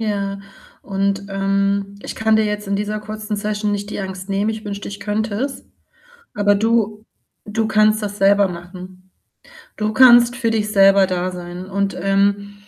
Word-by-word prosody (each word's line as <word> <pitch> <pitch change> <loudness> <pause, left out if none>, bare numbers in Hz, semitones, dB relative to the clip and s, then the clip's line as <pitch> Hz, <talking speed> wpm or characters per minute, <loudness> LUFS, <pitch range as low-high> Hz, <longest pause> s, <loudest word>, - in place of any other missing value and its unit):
Ja, 200 -2 -2 0.4
und, 195 0 -1
ähm, 195 0 -1
ich - - -5
kann 220 0 +2
dir 220 - +2
jetzt 210 -1 -3
in 200 - 0
dieser 210 +1 -3
kurzen 215 0 -5
Session 210 0 -2
nicht 205 0 -4
die - - -5
Angst 190 -1 -6
nehmen, 200 +2 0
ich 220 0 -4
wünschte, 205 -1 -6
ich 205 0 -8
könnte 210 +1 -2
es. 270 +6 -4 0.7
Aber 205 0 +3
du 215 0 0 0.4
du 220 +1 -1
kannst 215 0 +3
das 205 0 -4
selber 200 +1 +4
machen. 185 +1 -10 0.7
Du 215 0 -1
kannst 240 0 +7
für 230 -3 0
dich 210 -1 -1
selber 195 -1 +5
da 185 0 -2
sein 180 0 -8
und, 200 +1 -2
ähm 200 +1 +1
205 Hz, 170 wpm, -19 LUFS, 195-215 Hz, 0.7 s, kannst